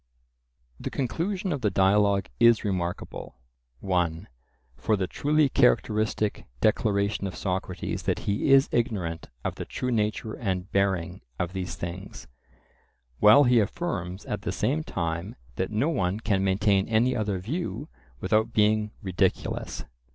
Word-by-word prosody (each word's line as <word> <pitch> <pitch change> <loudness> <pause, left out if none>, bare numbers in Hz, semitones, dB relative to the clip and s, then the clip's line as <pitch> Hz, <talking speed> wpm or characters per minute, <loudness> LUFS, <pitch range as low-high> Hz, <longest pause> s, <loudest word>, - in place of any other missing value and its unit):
The - - -4
conclusion 180 - -2
of 140 - -4
the 105 - +2
Dialogue 100 +1 +3
is 115 -1 +5
remarkable, 90 -9 -4 0.5
(1) 90 -1 -1 0.5
for 85 - +1
the 95 - 0
truly 150 +9 +2
characteristic 110 - +1
declaration 100 - +1
of 95 - -6
Socrates 90 -1 -3
that - - 0
he 100 +6 0
is 135 0 +7
ignorant 100 -9 -1 0.2
of - - -1
the - - -6
true 125 - -3
nature 110 -1 -1
and 95 -4 -3
bearing 95 -4 0 0.2
of 90 +1 -2
these 90 -3 -4
things, 90 +3 -7 0.9
while 105 +8 +8
he 125 -2 +5
affirms 100 - -3
at - - -4
the - - -3
same 80 - 0
time 85 +4 -3 0.2
that 95 - -1
no 110 +9 +1
one 100 - 0
can 100 -4 0
maintain 95 0 +2
any 115 +3 +2
other 105 -4 -1
view 140 - -4 0.3
without 110 +5 +1
being 105 0 +3
ridiculous. 95 0 -1
100 Hz, 135 wpm, -26 LUFS, 95-115 Hz, 0.9 s, while